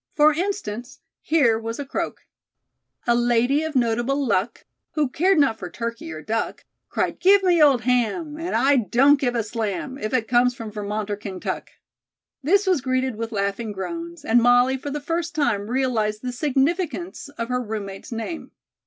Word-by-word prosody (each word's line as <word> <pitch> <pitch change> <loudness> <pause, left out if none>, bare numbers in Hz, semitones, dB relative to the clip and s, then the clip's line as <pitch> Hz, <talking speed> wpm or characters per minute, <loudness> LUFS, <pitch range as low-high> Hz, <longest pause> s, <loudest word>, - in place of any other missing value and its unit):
For 300 0 +6
instance, 310 - -3 0.2
here 270 -9 +3
was 230 0 -5
a 285 - -4
croak: 270 - -4 0.8
"A 240 - +4
lady 240 +4 +2
of 315 -2 -4
notable 245 +3 +1
luck, 210 0 -1 0.3
Who 300 -2 +1
cared 360 +8 +2
not 275 -7 +3
for 180 - -6
turkey 230 -2 -5
or 155 -1 -7
duck, 225 +7 -3 0.2
Cried, - - -1
'Give 390 +1 +5
me 350 -3 +4
old 275 -5 +6
ham 250 +6 0
And 340 +2 -2
I 270 +4 +4
don't 270 +5 +4
give 245 -3 0
a 230 - +1
slam, 225 +4 -4
If 215 - -3
it 240 -4 0
comes 245 +1 +3
from 225 -2 -7
Vermont 210 0 -3
or 205 - -2
Kaintuck.'" 195 -3 -5 0.7
This 390 +9 +3
was 365 -7 +2
greeted 255 -1 0
with 230 +1 -4
laughing 200 +2 -2
groans, 335 - -6
and 235 +2 +4
Molly 245 +2 +5
for 270 +2 -5
the 295 +1 -3
first 335 +3 -2
time 220 -9 0
realized 235 -4 0
the 250 - -2
significance 305 +5 -1
of 230 0 -3
her 250 0 0
roommate's 210 -3 -6
name. 230 +9 -5
250 Hz, 175 wpm, -23 LUFS, 225-295 Hz, 0.8 s, For